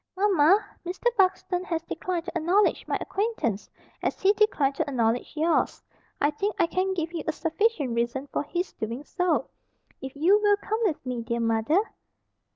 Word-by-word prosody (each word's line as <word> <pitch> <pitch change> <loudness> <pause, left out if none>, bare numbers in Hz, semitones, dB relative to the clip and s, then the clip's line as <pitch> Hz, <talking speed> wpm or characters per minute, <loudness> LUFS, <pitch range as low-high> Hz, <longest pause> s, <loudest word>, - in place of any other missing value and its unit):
"Mamma, 390 -1 +4 0.2
Mr. 380 +7 -1
Buxton 370 -2 +1
has 330 -2 -2
declined 340 0 -3
to 350 - -7
acknowledge 355 +5 +2
my - - 0
acquaintance 385 - -2 0.3
as - - -2
he 390 +1 +4
declined 405 -10 +2
to - - -1
acknowledge 235 -2 0
yours. 325 +2 +1 0.4
I 290 - +3
think 395 +8 -2
I - - +4
can 375 +2 -1
give 335 -1 -3
you 335 - -3
a - - +2
sufficient 325 - 0
reason 235 +3 -1
for - - +1
his 350 +5 -3
doing 230 +5 -5
so, 360 +3 0 0.5
if 265 0 -7
you 370 +8 +4
will 410 -1 +4
come 435 +2 -3
with 320 -9 -1
me, 250 -2 -3
dear 235 +1 -2
mother." 230 - +2
335 Hz, 170 wpm, -26 LUFS, 270-385 Hz, 0.5 s, Mamma